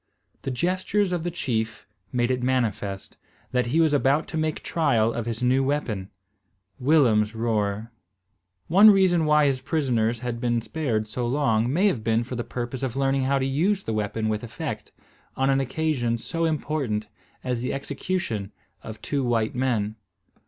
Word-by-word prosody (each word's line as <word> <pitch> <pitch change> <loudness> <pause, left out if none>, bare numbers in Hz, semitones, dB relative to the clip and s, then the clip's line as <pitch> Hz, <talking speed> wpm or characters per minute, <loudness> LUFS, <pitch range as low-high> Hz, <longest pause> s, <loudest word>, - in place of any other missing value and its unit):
The - - -4
gestures 185 +7 0
of 175 -2 -1
the 175 - -1
chief 115 -9 -3 0.3
made 120 0 +1
it 125 -1 -1
manifest, 110 -6 -2 0.3
that 125 -1 +1
he 150 +7 +1
was 160 -2 +4
about 140 +2 +2
to - - -6
make 155 -1 -1
trial 115 -9 +2
of 120 -1 -3
his 115 +1 -3
new 130 +2 +3
weapon, 120 -9 -2 0.7
Willem's 120 -7 +3
roer. 110 -1 -1 0.8
One 200 +6 +8
reason 185 -5 +4
why 150 -1 +4
his 135 -2 +1
prisoners 125 -6 0
had 120 -1 -4
been 120 -1 +1
spared 115 -3 -2
so 120 +3 -3
long 120 -3 +1
may 180 +8 +2
have 135 - +1
been 115 +1 +2
for 125 +2 -6
the 120 - -2
purpose 120 +2 -5
of 130 -3 -2
learning 135 -1 +1
how 140 +1 +2
to 135 - 0
use 180 +9 +1
the 110 - -3
weapon 110 +1 -1
with 110 0 -1
effect, 120 - -6 0.5
on 135 +1 +2
an 135 - +3
occasion 130 -3 0
so 165 +8 -2
important 140 -9 -1 0.4
as 125 -2 -2
the 125 - -2
execution 135 - -3 0.3
of 110 -1 -8
two 140 -2 -1
white 115 -3 +1
men. 115 -4 -1
125 Hz, 170 wpm, -25 LUFS, 115-150 Hz, 0.8 s, One